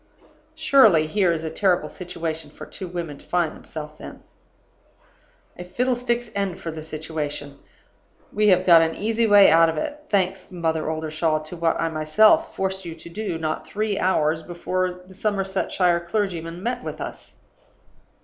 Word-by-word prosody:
"Surely, 265 - +5
here 185 +2 +2
is 165 -1 -2
a 160 - -3
terrible 185 -3 +1
situation 165 -3 -5
for - - -10
two 185 - -7
women 170 -5 -5
to - - -19
find 175 -3 0
themselves 150 -1 -9
in? - - -10 1.4
A - - -5
fiddlestick's 240 +3 -1
end 195 -3 -2
for 165 - -5
the 155 0 -7
situation! 150 -2 -5 0.7
We 210 0 +2
have 185 -2 +4
got 170 -2 +8
an 160 0 0
easy 225 +2 0
way 205 -1 +7
out 165 0 +6
of 160 - -3
it 295 - -4
thanks, 190 -1 0
Mother 160 -3 -1
Oldershaw, 155 0 -1
to 155 +3 -8
what 165 -1 0
I 165 - 0
myself 210 - +3
forced 190 0 -2
you 170 -2 -7
to 170 - -11
do, 190 -1 -4
not 155 -1 -3
three 210 -1 -2
hours 160 -3 +1
before 180 +2 -3
the 190 - -14
Somersetshire 190 -3 0
clergyman 170 -2 -3
met 245 +1 -2
with - - -6
us. - - -8
175 Hz, 160 wpm, -23 LUFS, 160-200 Hz, 1.4 s, got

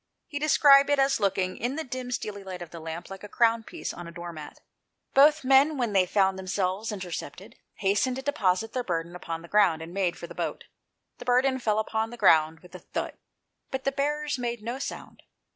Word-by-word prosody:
He 290 -3 -5
described 285 -2 +6
it 285 - +3
as 270 -2 +3
looking, 195 -2 0
in 245 +4 -2
the 320 - -3
dim, 255 -2 -6
steely 210 -5 -4
light 185 -2 -6
of 170 - -13
the 170 - -8
lamp, 165 +3 -7
like 195 - -9
a - - -7
crown 230 0 +3
piece - - -6
on 175 - -8
a - - -8
door 170 0 -7
mat. 155 -2 -10 0.5
Both 295 +3 +6
the - - -6
men, 275 +3 +5
when 240 -5 -1
they 185 -2 +4
found 190 0 +2
themselves 190 +3 -2
intercepted, 190 +1 -7 0.2
hastened 210 +6 +1
to 265 - -6
deposit 220 -7 0
their 255 - -1
burden 170 -3 -3
upon 165 -2 -6
the - - -11
ground, 180 -5 +3
and 165 +2 -9
made 185 -3 0
for - - -7
the - - -10
boat. - - -4 0.6
The 245 - -9
burden 260 +2 +3
fell 215 -4 0
upon 220 +1 -1
the 240 - -9
ground 160 -5 +4
with 180 0 -17
a 180 - -8
thud, - - -4 0.6
but 265 0 -4
the 275 - +1
bearers 295 0 -1
made 240 -2 -3
no 240 +4 -4
sound. - - -7
210 Hz, 220 wpm, -27 LUFS, 180-260 Hz, 0.6 s, described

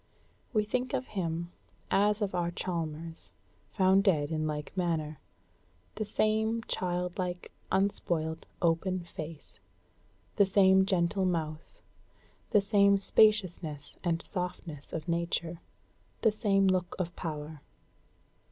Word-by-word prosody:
We 215 -4 +2
think 250 +5 -1
of 260 -1 -2
him 170 -3 -3 0.4
as 210 +2 +3
of 195 - -2
our 175 -1 0
Chalmers, 165 -2 -5 0.4
found 190 0 +4
dead 160 -7 +2
in 155 -1 0
like 150 +2 -4
manner: 160 -5 -1 0.7
the 215 - -3
same 220 +2 +1
childlike, 180 -2 -2 0.2
unspoiled, 165 -5 0 0.2
open 175 +2 +1
face; 160 - -9 0.8
the 200 - +6
same 190 -1 +5
gentle 185 +1 +1
mouth; 160 -3 -3 0.7
the 210 - +5
same 200 -1 +4
spaciousness 185 -8 +2
and 170 -2 0
softness 175 -5 -5
of 160 +1 -5
nature; 170 0 -1 0.6
the 220 - +5
same 200 -2 +2
look 185 -2 +1
of 175 -2 -3
power. 150 -2 -5
180 Hz, 115 wpm, -30 LUFS, 165-200 Hz, 0.8 s, the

